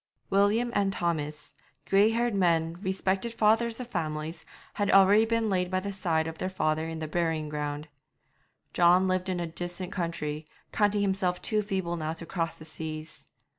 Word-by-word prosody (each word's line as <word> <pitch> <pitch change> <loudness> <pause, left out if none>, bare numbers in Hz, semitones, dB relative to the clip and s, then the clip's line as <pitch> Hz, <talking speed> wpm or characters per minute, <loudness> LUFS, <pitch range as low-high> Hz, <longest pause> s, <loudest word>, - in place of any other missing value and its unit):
William 205 +5 +3
and 200 -1 +2
Thomas, 155 -5 -3 0.3
grey 200 +2 +5
haired 235 +1 +1
men, 165 -4 +2
respected 190 +3 -1
fathers 225 +2 +2
of 250 - -4
families, 160 -5 -4 0.3
had 205 -1 -1
already 195 +3 +6
been 230 0 +1
laid 180 -3 +1
by 185 0 +1
the 200 +1 -4
side 165 -5 0
of 160 0 -6
their 185 - -1
father 155 -3 0
in 165 0 -5
the 160 -1 -4
burying 160 -1 -1
ground. 150 0 -4 0.9
John 180 +2 +5
lived 185 0 0
in 180 -1 -1
a 170 - -1
distant 175 +2 -5
country, 155 -4 -3 0.2
counting 205 -1 +2
himself 190 -2 0
too 215 +2 0
feeble 190 -4 -2
now 160 0 -2
to 165 +1 -9
cross 165 -2 -2
the 155 - -11
seas. 155 0 -7
180 Hz, 170 wpm, -28 LUFS, 160-200 Hz, 0.9 s, already